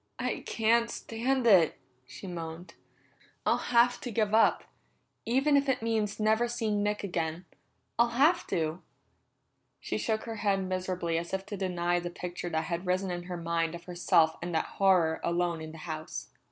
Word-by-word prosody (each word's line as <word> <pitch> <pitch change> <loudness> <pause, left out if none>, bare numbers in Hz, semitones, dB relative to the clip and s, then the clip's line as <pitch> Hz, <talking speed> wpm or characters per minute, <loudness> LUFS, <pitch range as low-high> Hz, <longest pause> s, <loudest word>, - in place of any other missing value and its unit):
"I - - -2
can't 230 +1 +2
stand 245 +4 -1
it!" 185 -8 +5 0.3
she 135 +6 -10
moaned. 170 -1 -7 0.7
"I'll - - +1
have 240 +1 +5
to 245 - -4
give 215 -2 0
up, 220 0 +4 0.6
even 270 +5 +3
if 280 0 +3
it 255 - 0
means 220 -3 -1
never 220 +2 +3
seeing 225 -4 -1
Nick 210 0 -1
again. 170 -2 -3 0.5
I'll 235 0 +3
have 340 +5 +4
to!" 160 +1 -1 1.0
She - - -3
shook 220 -1 -1
her 225 -1 -6
head 195 -2 +1
miserably 185 -3 -1
as 170 +3 -3
if 190 0 -5
to 205 - -5
deny 175 -2 0
the 175 0 -4
picture 175 0 -5
that 160 -1 -1
had 170 +3 -4
risen 185 +1 0
in 175 0 -4
her 180 -1 -5
mind 165 0 -1
of 170 - -9
herself 175 -2 +2
and 175 0 -4
that 160 - +1
horror 180 -5 +2
alone 170 -1 0
in 160 0 -7
the 160 - -11
house. 155 -1 -6
185 Hz, 175 wpm, -29 LUFS, 170-225 Hz, 1.0 s, it